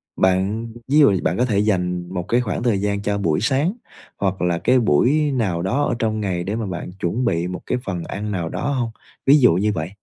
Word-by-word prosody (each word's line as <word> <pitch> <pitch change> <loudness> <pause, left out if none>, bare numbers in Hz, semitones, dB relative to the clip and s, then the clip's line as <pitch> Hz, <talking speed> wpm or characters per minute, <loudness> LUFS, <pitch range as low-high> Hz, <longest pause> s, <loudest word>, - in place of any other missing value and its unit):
Bạn 95 +5 +1 0.2
ví 150 +3 +4
dụ 100 -10 +5
bạn 85 - 0
có 125 - +2
thể 105 -5 +1
dành 90 -4 0
một 90 -1 -2
cái 120 +1 +2
khoảng 105 -2 -3
thời 105 -6 +1
gian 100 0 -1
cho 100 0 -1
buổi 80 -6 +1
sáng 140 - +1 0.4
hoặc 95 -1 -1
là 90 -1 +1
cái 130 +1 +3
buổi 140 - +3
nào 100 -10 -1
đó 130 +11 0
ở - - 0
trong 110 -1 0
ngày 90 -3 -2
để 100 +4 -3
mà 115 -2 -2
bạn 90 -1 -5
chuẩn 110 +9 -1
bị 85 -2 0
một 90 0 -5
cái - - -1
phần 90 -3 -3
ăn 105 +1 -5
nào 85 -4 -2
đó 145 - -3
hông? 120 -4 -1 0.3
Ví 140 +2 +7
dụ 125 - +6
như 105 +4 +1
vậy, 80 -1 -3
100 Hz, 240 wpm, -21 LUFS, 90-120 Hz, 0.4 s, Ví